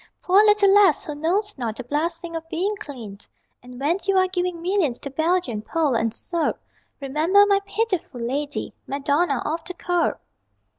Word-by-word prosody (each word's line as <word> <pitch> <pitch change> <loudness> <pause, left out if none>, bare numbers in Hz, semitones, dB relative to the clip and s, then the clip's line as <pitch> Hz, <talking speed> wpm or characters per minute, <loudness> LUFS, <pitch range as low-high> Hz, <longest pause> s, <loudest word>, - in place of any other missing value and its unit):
Poor 370 +2 +3
little 415 -2 +5
lass, 400 -7 +5
who 300 - -4
knows 370 +8 -1
not 225 -3 -3
The 255 - -6
blessing 330 +5 -3
of 325 0 -6
being 385 +6 -1
clean. 235 - -9 0.4
And 250 0 -12
when 315 +7 +1
you 390 -1 +3
are 370 0 +4
giving 360 -2 -2
millions 345 -8 0
To 280 - -6
Belgian, 315 -6 0
Pole 305 +4 0
and 230 -1 +1
Serb, 335 +7 -2 0.4
Remember 310 +9 +3
my 400 -1 +3
pitiful 400 - -2
lady 280 +5 -3
Madonna 285 +1 0
of 320 +2 -2
the 360 - -7
Curb! 355 -1 0
330 Hz, 165 wpm, -23 LUFS, 275-370 Hz, 0.4 s, little